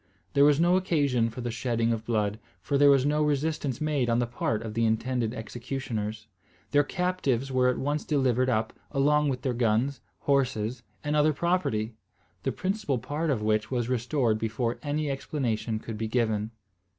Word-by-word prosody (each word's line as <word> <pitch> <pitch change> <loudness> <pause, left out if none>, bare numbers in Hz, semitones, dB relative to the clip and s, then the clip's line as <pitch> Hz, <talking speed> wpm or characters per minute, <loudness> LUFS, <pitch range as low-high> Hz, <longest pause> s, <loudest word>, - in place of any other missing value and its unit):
There 140 0 +6
was 145 0 +5
no 175 +2 +4
occasion 145 -10 +1
for 115 +3 -7
the 120 0 -3
shedding 115 -1 0
of 110 0 -4
blood, 105 -2 0 0.2
for 140 - -2
there 145 +1 +6
was 135 -1 +5
no 150 +1 +2
resistance 150 -3 0
made 150 -5 0
on 115 - +3
the 120 - +2
part 115 -2 -2
of 110 -2 -5
the 115 +1 0
intended 115 +1 0
executioners. 110 -2 -4 0.5
Their 145 0 +5
captives 145 -8 -1
were 130 -1 +3
at 125 - 0
once 145 +2 -1
delivered 130 -3 +2
up 110 -2 0 0.2
along 150 +1 +3
with 125 -2 -3
their 130 - 0
guns, 120 +2 +1 0.2
horses, 130 -4 0 0.2
and 150 0 0
other 150 +1 +4
property, 140 -10 0 0.5
the - - -1
principal 185 -8 -1
part 150 +7 -2
of 120 -7 0
which 110 0 +1
was 120 -2 -1
restored 125 -2 +1
before 115 +2 -2
any 150 0 -1
explanation 120 -5 -2
could 110 0 -7
be 110 - -1
given. 110 -2 0
125 Hz, 175 wpm, -28 LUFS, 115-145 Hz, 0.5 s, There